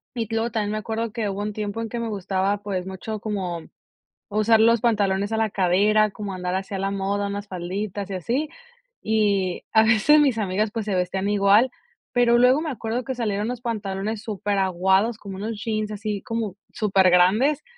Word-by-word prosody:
Y 230 -2 -2
luego 225 +1 0
también 210 -2 -1
me 215 - -2
acuerdo 225 +2 -3
que 220 -2 -2
hubo 195 +1 -4
un 210 0 -3
tiempo 210 +1 -4
en 225 - -4
que 240 - -4
me 235 - -2
gustaba, 195 0 -1
pues, 195 -3 -4
mucho 200 +3 -5
como 190 -5 -3 0.7
usar 215 +1 +3
los 230 +1 +5
pantalones 205 -3 +1
a 220 - 0
la 220 -1 +1
cadera, 205 +3 +3
como 205 -1 -6
andar 180 0 -3
así 195 +1 -4
a - - -3
la 195 +1 -1
moda, 200 +1 -1
unas 200 +1 -5
falditas 195 +2 -4
y - - -3
así. 245 - -1 0.5
Y 200 -4 +1
a 220 - +6
veces 220 +8 +5
mis 275 -6 +3
amigas, 210 +1 0
pues, 225 -1 -3
se 210 - -2
vestían 190 +2 -1
igual. 205 +4 +4 0.4
Pero, 240 -1 +4
luego 255 +4 +5
me 320 - -3
acuerdo 235 0 -3
que 260 +2 -4
salieron 210 -3 -1
unos 245 0 -4
pantalones 210 -2 -3
superaguados, 195 0 +1
como 195 -3 -8
unos 215 +1 -5
jeans 215 -1 -2
así 210 -1 -3
como 225 -4 -3 0.2
supergrandes 195 +8 +3
210 Hz, 190 wpm, -24 LUFS, 195-225 Hz, 0.7 s, a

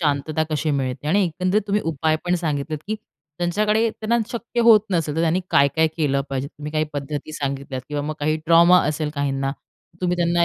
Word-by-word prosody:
शांतता 150 0 0
कशी 155 0 0
मिळते. 135 -1 -2
आणि 195 +4 +3
एकंदरीत 185 +4 0
तुम्ही 205 +1 +1
उपाय 160 0 +1
पण 175 - +1
सांगितले, 155 -3 -2
की 215 - -1 0.4
त्यांच्याकडे, 210 +6 +2
त्यांना 225 +2 -1
शक्य 235 0 -3
होत 230 -2 +7
नसेल, 165 -5 0
तर - - +1
त्यांनी 165 +2 +2
काय-काय 140 +3 +4
केलं 140 -4 +1
पाहिजे. 135 0 -2
तुम्ही 150 +1 -8
काही 155 0 +1
पद्धती 145 +1 -5
सांगितल्या 140 -2 -4
किंवा 145 -1 -2
मग 155 +1 -3
काही 155 +1 +1
ट्रॉमा 170 +2 +7
असेल 150 0 -2
काहींना, 135 -1 -1 0.5
तुम्ही 180 -1 0
त्यांना, 170 0 +2
155 Hz, 185 wpm, -22 LUFS, 145-180 Hz, 0.5 s, होत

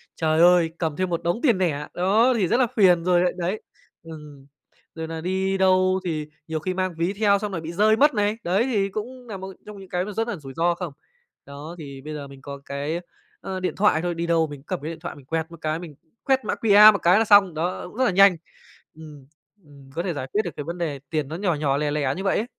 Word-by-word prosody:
trời 160 -1 +1
ơi, 175 -1 +5
cầm 160 -3 -2
thêm 185 +3 -1
một 170 -1 -2
đống 175 +7 0
tiền 235 -10 +3
nẻ, 150 -6 -1
đó, 215 +8 +3
thì 195 -5 +1
rất 235 - +2
là 250 - +3
phiền 180 -5 +4
rồi 175 -1 +3
lại, 180 - +2
đấy 185 +4 -2 0.4
ừm, 150 -4 -11 0.5
rồi 160 -1 -5
nà 160 0 -6
đi 190 +2 -1
đâu 185 0 +3
thì 155 -3 -3 0.2
nhiều 160 -1 -3
khi 185 +4 -3
mang 185 -1 -2
ví 170 +4 0
theo 200 -1 +2
xong 210 0 -4
rồi 170 -4 -4
bị 160 +1 -6
rơi 215 +4 +4
mất 295 +4 +4
này, 210 0 0
đấy, 185 +6 +1
thì 205 -7 0
cũng 245 +5 -7
nà 210 -4 -6
một 190 0 -8
trong 210 -1 -10
những 190 -1 -12
cái 180 +1 -1
nó 210 - -6
rất 225 +3 -2
là 235 - -3
rủi 135 -4 -10
ro 170 +3 +1
không? 175 -4 -6 0.5
Đó, 145 +4 -9
thì 140 -3 -9
bây 155 +3 -7
giờ 145 -2 -6
mình 135 -1 -14
có 140 0 -8
cái, 145 +4 -3 0.4
ờ, 190 -1 -5
điện 185 - -2
thoại 195 -6 +3
thôi, 175 0 -2
đi 170 +1 -3
đâu 165 -1 +2
mình 145 -2 -9
cũng 135 - -22
cầm - - -4
cái 155 +3 -5
điện 160 - -9
thoại 175 - -7
mình 140 - -15
quẹt 160 +3 -3
một 170 - -10
cái, 155 +1 -2
mình 165 -4 -10 0.3
quét 265 -1 +1
mã - - -1
QR 210 0 +8
một - - 0
cái 180 +5 +5
là 225 - +2
xong, 200 -4 +6
đó, 170 +4 -3
cũng 180 - -14
rất 260 - +2
là - - +2
nhanh. 195 0 +6 0.6
Ừm, 150 -3 -13 0.4
ừm, 140 -2 -17
có 170 - -2
thể 180 -3 -2
giải 135 -2 -5
quyết 210 - +3
được 175 - -3
cái 145 - -4
vấn 170 +3 -6
đề 155 -5 -3
tiền 155 -3 -2
nó 155 - -6
nhỏ 180 -1 0
nhỏ, 140 -2 0
lẻ 150 0 -1
lẻ 150 -1 0
như 190 - -5
vậy 195 - +1
ấy. 220 - -1
175 Hz, 270 wpm, -23 LUFS, 155-195 Hz, 0.6 s, QR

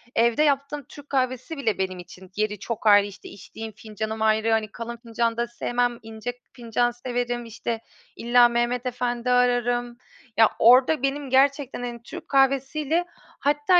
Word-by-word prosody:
evde 235 +5 +3
yaptığım 285 0 0
Türk 290 +3 -14
kahvesi 260 +3 -1
bile 230 -6 0
benim 185 -1 -2
için 180 +1 -13
yeri 210 -1 -1
çok 220 +1 -4
ayrı, 205 -1 +7
işte, 205 0 -11
içtiğim 220 +2 -9
fincanım 220 +1 -6
ayrı, 220 +1 +2
hani, 220 -2 +1
kalın 235 +2 -6
fincanda 235 0 -1
sevmem 240 0 -1
ince 225 +2 -6 0.2
fincan 240 0 0
severim, 240 0 -3
işte, 230 0 -4 0.3
illa 240 +1 +5
Mehmet 240 +1 0
Efendi 245 0 -1
ararım. 245 -1 +1 0.4
Ya, 225 -1 +7
orada 255 +4 +5
benim 275 0 -1
gerçekten, 275 0 +2
hani, 240 -1 -6
Türk 330 +6 -9
kahvesiyle, 275 +4 +2 0.3
hatta 295 +5 +3
240 Hz, 150 wpm, -24 LUFS, 225-265 Hz, 0.4 s, ayrı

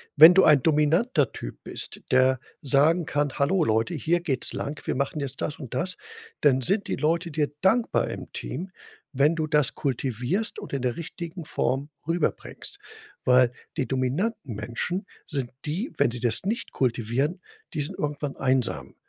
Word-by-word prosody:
wenn 160 +4 +11
du 190 - +6
ein 150 -4 +6
dominanter 150 - +3
Typ - - -8
bist, - - -5
der 130 0 +4 0.2
sagen 150 +5 +3
kann: 145 -1 0
„Hallo, 160 +6 +3
Leute, 110 +6 +1
hier 170 +2 +1
geht's 140 -7 -1
lang. 145 +1 -4
Wir - - -1
machen 140 +3 -1
jetzt 140 -2 -5
das 150 - -3
und 130 -6 -8
das.“ 180 +1 -1 0.4
Dann 130 -2 +4
sind 200 - 0
die - - -1
Leute 165 +2 0
dir 145 -1 0
dankbar 225 +5 +2
im - - -7
Team, 185 +2 -5 0.4
wenn 145 +5 +3
du 155 -1 -1
das 150 -3 +2
kultivierst 135 - -1
und - - -9
in 140 - -1
der 125 +2 -1
richtigen 170 0 -6
Form 140 0 -1 0.2
rüberbringst. 165 -1 -2 0.5
Weil 125 -1 +5 0.3
die 130 -6 0
dominanten 135 - -1
Menschen 120 - -3 0.2
sind 135 -5 -3
die 185 - -2
wenn 120 - +3
sie 120 - -4
das 115 -2 0
nicht 215 +5 -2
kultivieren, 130 - 0 0.3
die 150 - -1
sind 145 - -4
irgendwann 145 -1 -3
einsam, 130 -3 0
145 Hz, 165 wpm, -26 LUFS, 130-170 Hz, 0.5 s, wenn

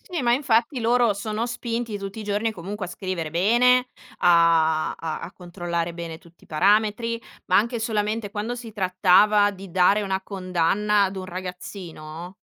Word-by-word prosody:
sì. 345 -5 -5
Ma, 240 -1 +3
infatti, 245 0 +1
loro 235 -1 +3
sono 215 +3 -3
spinti 235 -2 -3
tutti 195 +2 -7
i - - -5
giorni, 210 +2 -1
comunque 195 +1 -6
a - - -10
scrivere 180 -3 -4
bene, 240 +9 +3 0.3
a 165 -2 +4
a 165 +3 -5
controllare 175 -2 -4
bene 170 -1 -7
tutti 170 +1 -21
i - - -22
parametri, 210 +7 +1 0.3
ma - - +3
anche 235 +2 +1
solamente 215 -1 -1
quando 215 +4 -3
si 240 -2 -8
trattava 200 +2 +4
di 195 -1 -10
dare 190 +4 +4
una 190 -1 -2
condanna 195 +2 +1
ad 195 0 -1
un 185 - -5
ragazzino, 180 -2 -8
200 Hz, 160 wpm, -24 LUFS, 180-225 Hz, 0.3 s, a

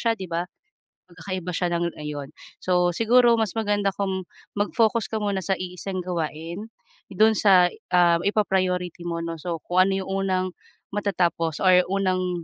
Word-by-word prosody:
siya 230 -1 +2
'di 190 - -5
ba. 170 +1 -1 0.7
Mag-kakaiba 180 +1 -5
siya 175 0 -1
ng 170 0 -1
ayon, 145 -2 -5 0.3
so 180 -1 +2
siguro 235 +2 +5
mas 220 -4 0
maganda 205 -2 +1
kung 190 -1 -2 0.3
mag-focus 220 +2 +1
ka 220 - -1
muna 200 -3 -1
sa 195 -1 0
iisang 185 +1 -5
gawain, 170 +3 -4 0.4
do'n 220 +3 +4
sa, 185 -4 +5 0.2
ah, 175 -1 +4
ipa-priority 185 -4 0
mo 170 -1 -3
'no 165 0 -4
so 165 +1 -4
kung 180 +1 +4
ano 195 - 0
'yong 190 - -6
unang 190 -1 0 0.5
matatapos 175 -6 0
or 180 -1 +6
unang, 185 -3 0
185 Hz, 155 wpm, -24 LUFS, 175-200 Hz, 0.7 s, or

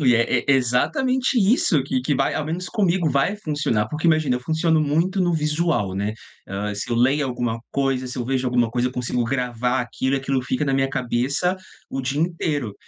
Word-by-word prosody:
Ui, 125 -4 +4
é 115 +1 +2
é - - -4
exatamente 250 - +1
isso 195 - +3
que 130 -1 -1
que 140 +3 0
vai 135 +1 +1
ao 150 - -1
menos 175 +3 -4
comigo, 180 -5 +1
vai 140 +10 +1
funcionar. 145 - -1
Porque, 155 +5 -2
imagina, 155 -6 +3
eu - - -6
funciono 160 +3 +1
muito 165 +6 +1
no 175 -1 +2
visual, 150 - 0
né, 105 +2 -2 0.3
hã, 100 +2 -3
se 100 - -5
eu - - +1
leio 135 +4 +3
alguma 120 -2 -2
coisa, 135 -2 0
se 125 - -7
eu 120 - -2
vejo 130 0 -1
alguma 120 -2 +2
coisa, 125 +1 0
eu - - -10
consigo 125 -1 -1
gravar 125 0 -1
aquilo 130 +2 -2
e - - +1
aquilo 135 -1 -1
fica 130 +3 -1
na 135 - 0
minha 135 0 +2
cabeça 135 +7 0 0.3
o 135 - -2
dia 135 +3 -2
inteiro. 155 - -1
135 Hz, 210 wpm, -22 LUFS, 125-155 Hz, 0.3 s, Ui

